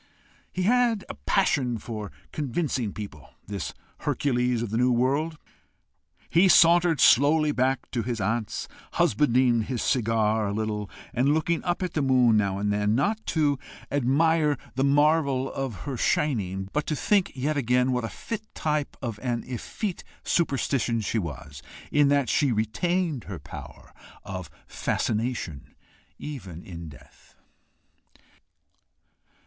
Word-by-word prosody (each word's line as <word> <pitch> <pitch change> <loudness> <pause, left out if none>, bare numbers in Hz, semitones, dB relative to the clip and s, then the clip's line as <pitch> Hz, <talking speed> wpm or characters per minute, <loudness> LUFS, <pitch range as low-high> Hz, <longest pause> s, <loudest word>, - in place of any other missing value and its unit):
He 185 - -2
had 235 -1 +2
a - - -4
passion 140 - +1
for 105 -4 -6 0.2
convincing 135 -5 -2
people, 85 -11 -9
this 100 0 -4 0.3
Hercules 125 -3 0
of 110 - -5
the 110 - 0
new 125 +1 +3
world. 140 +7 +1 0.9
He 175 +4 +4
sauntered 170 -2 +6
slowly 150 +4 +5
back 130 -1 0
to 120 - -1
his 120 0 -3
aunt's, 110 +2 -2 0.3
husbanding 120 -1 +3
his 120 0 -3
cigar 110 -3 +1
a 100 - -2
little, 105 -1 -2 0.2
and 135 +4 +3
looking 165 +1 0
up 180 +1 -1
at 180 - -3
the 155 - 0
moon 130 -4 +4
now 100 -2 +1
and 105 +1 0
then, 105 +1 +1
not 210 - 0
to 145 -4 +1 0.3
admire 150 +3 +2 0.2
the 135 - 0
marvel 140 -2 +2
of 130 -9 -4
her 135 -3 -4
shining, 95 -10 0
but 150 0 -1
to 155 - 0
think 200 +5 +1
yet 145 +4 -1
again 125 -1 +2
what 125 -1 0
a 115 - -3
fit 225 - -5
type 150 -2 -1
of 115 -4 -4
an 120 -2 -2
effete 170 - -4 0.2
superstition 135 -6 +1
she 110 +2 -1
was, 75 -5 -7 0.3
in 145 -1 +4
that 140 -2 +2
she 140 +3 +2
retained 150 - 0
her 95 - -6
power - - -11 0.3
of 95 -3 -6 0.2
fascination 110 - -2 0.4
even 95 - -7
in 85 -3 -8
death. 70 - -18
130 Hz, 140 wpm, -26 LUFS, 110-150 Hz, 0.9 s, sauntered